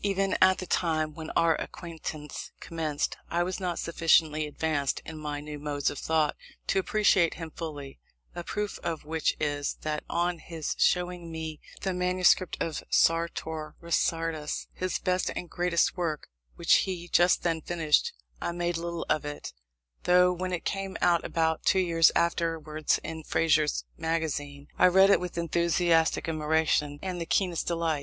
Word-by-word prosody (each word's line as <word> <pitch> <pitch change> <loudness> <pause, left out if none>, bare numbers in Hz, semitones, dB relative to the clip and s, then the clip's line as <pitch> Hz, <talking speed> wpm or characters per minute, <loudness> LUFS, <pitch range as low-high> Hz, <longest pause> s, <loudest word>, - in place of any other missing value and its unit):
Even 195 -1 +1
at 185 0 +6
the 185 - -5
time 155 -3 0
when 160 0 -7
our 165 -1 +4
acquaintance 160 -3 -7
commenced, 155 -3 -2
I 175 +1 +1
was 185 +2 -3
not 180 -3 -2
sufficiently 160 -2 +2
advanced 150 -2 -1
in 160 -1 -7
my 150 -1 -4
new 150 0 -7
modes 145 -1 -1
of 145 - -7
thought 160 -2 +1 0.3
to - - +3
appreciate 190 -4 +3
him 165 -1 -7
fully; 145 -5 -7 0.3
a 175 - -5
proof 210 +3 -3
of 165 -3 -4
which 160 +1 0
is, 145 -1 -1
that 150 -1 -2
on 175 0 0
his 160 -2 -4
showing 180 -1 +1
me 160 -1 -5 0.2
the 190 - -1
manuscript 180 0 +2
of 160 -2 -2
Sartor 160 -2 +1
Resartus, 165 -2 -1
his 185 0 -2
best 185 0 0
and 180 - -4
greatest 175 -1 +1
work, 165 - -3 0.3
which - - +4
he 175 -2 -2
just 175 +1 +3
then 165 -2 0
finished, 160 -2 +1 0.3
I 170 - -2
made 175 0 -1
little 170 0 -4
of 155 0 +1
it; 145 0 -6 0.5
though 180 0 +5
when 185 +1 -3
it 180 - -3
came 195 -1 -3
out 175 -1 +3
about 160 -1 0
two 190 - +3
years 170 -3 +4
afterwards 165 -2 0
in 160 0 -5
Fraser's 155 -1 +2 0.2
Magazine 150 -3 -2
I - - +7
read 190 +2 +6
it - - +5
with 180 -1 -6
enthusiastic 170 -1 +2
admiration 155 -2 +1
and 180 -2 -3
the 165 - -4
keenest 180 -3 0
delight. 165 -3 0
165 Hz, 160 wpm, -28 LUFS, 155-175 Hz, 0.5 s, I